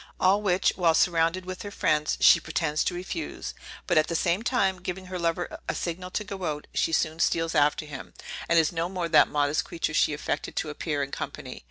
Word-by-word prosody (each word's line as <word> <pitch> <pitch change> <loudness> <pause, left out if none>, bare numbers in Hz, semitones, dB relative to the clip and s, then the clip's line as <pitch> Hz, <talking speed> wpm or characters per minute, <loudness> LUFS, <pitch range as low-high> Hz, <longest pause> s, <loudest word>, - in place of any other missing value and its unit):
all 195 +3 +4
which, 190 -3 +2
while 170 -3 +3
surrounded 170 +2 +2
with 185 0 -6
her 205 - -6
friends, 150 -6 +1
she - - +7
pretends 155 -1 -1
to 180 - -1
refuse; 190 - -5 0.3
but 165 - +4
at 155 - +1
the 170 - -2
same 175 +4 +1
time 195 -7 +1
giving 185 +1 -5
her 185 0 -5
lover 170 +1 -2
a - - -1
signal 180 +1 -4
to 210 - -2
go 195 -2 -7
out, 150 -2 -3
she - - +1
soon 160 0 0
steals 165 -1 +1
after 150 +1 +2
him, 145 -3 -8 0.4
and 170 - +4
is 160 -2 +4
no 170 0 -2
more 180 -2 -2
that 165 - +6
modest 145 0 +1
creature 165 -3 -3
she 155 - +3
affected 150 0 -3
to 150 - -2
appear 150 -1 -2
in 140 - -6
company. - - -6
170 Hz, 215 wpm, -27 LUFS, 155-185 Hz, 0.4 s, she